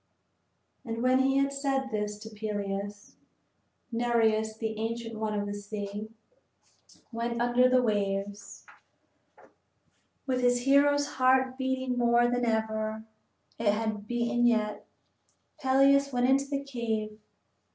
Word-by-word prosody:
And 230 0 -4
when 255 +1 +4
he 270 +1 +2
had 275 0 +1
said 270 -1 -1
this 210 -1 -2
to 220 +1 -9
Peleus, 205 -1 -5 0.8
Nereus, 225 -2 +1
the 220 -1 -3
ancient 230 0 -4
one 215 -1 -1
of 205 - -2
the 205 - -4
sea, 205 +1 -6 1.0
went 235 0 -3
under 245 +1 +3
the 255 0 +4
waves. 200 -2 -2
II - - -26 0.8
With 255 -2 0
his 245 0 +2
hero's 285 +2 +4
heart 260 -1 +2
beating 260 -1 -2
more 240 0 +4
than 245 0 0
ever 220 -1 -1 0.6
it 220 -3 +3
had 215 -1 -3
beaten 240 0 +1
yet, 215 -3 0 0.7
Peleus 275 +1 +4
went 245 -1 +1
into 270 +1 +3
the 280 -1 -2
cave. 220 -5 -3
235 Hz, 125 wpm, -29 LUFS, 215-260 Hz, 1.0 s, when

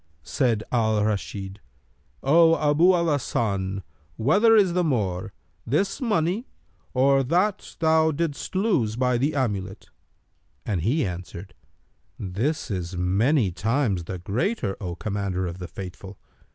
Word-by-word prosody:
Said 115 - 0
Al 110 -3 +2
Rashid, 100 -1 -3 0.6
"O 165 +4 +5
Abu 150 +5 +4
al 170 -1 +1
Hasan, 100 - -1 0.3
whether 205 - +4
is 195 -5 +4
the 180 0 +2
more, 100 - -1 0.3
this 170 - -1
money 210 0 0 0.5
or 135 +1 +4
that 180 +9 0
thou 160 -1 +3
didst 160 +2 -3
lose 185 - +1
by 125 0 +1
the 145 +4 0
amulet?[FN#297]"; 100 -7 -3 0.7
and 100 -7 -1
he 130 - +1
answered, 90 +1 -7 0.6
"This 115 - -2
is 90 -2 -4
many 100 - +2
times 105 -1 0
the 95 +2 -5
greater, 105 - -2
O 90 -3 -4
Commander 100 -2 -2
of 85 +1 -5
the 90 - -6
Faithful!" 95 +2 -9
115 Hz, 125 wpm, -25 LUFS, 95-160 Hz, 0.7 s, O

